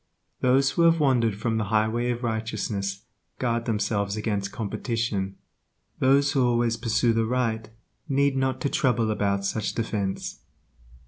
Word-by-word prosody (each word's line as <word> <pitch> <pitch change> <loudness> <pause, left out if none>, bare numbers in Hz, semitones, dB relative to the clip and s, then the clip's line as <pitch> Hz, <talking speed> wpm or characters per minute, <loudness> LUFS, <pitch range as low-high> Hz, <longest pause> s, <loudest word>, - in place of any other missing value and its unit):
Those 135 +2 +3
who - - 0
have 165 0 +5
wandered 120 -7 +2
from 110 +1 -1
the 110 - 0
highway 110 +3 +1
of 120 0 -2
righteousness 110 -3 -3 0.3
guard 115 -2 -1
themselves 105 -2 -1
against 100 -2 -2
competition; 110 -3 -2 0.6
those 140 +2 +4
who 135 -3 +2
always 120 -1 +2
pursue 115 0 +1
the 115 0 +1
right 115 -3 -1 0.4
need 140 0 +2
not 130 -1 0
to 140 - 0
trouble 115 -5 +1
about 100 -2 0
such 110 +2 -2
defense. 105 -4 -3
115 Hz, 140 wpm, -26 LUFS, 105-125 Hz, 0.6 s, have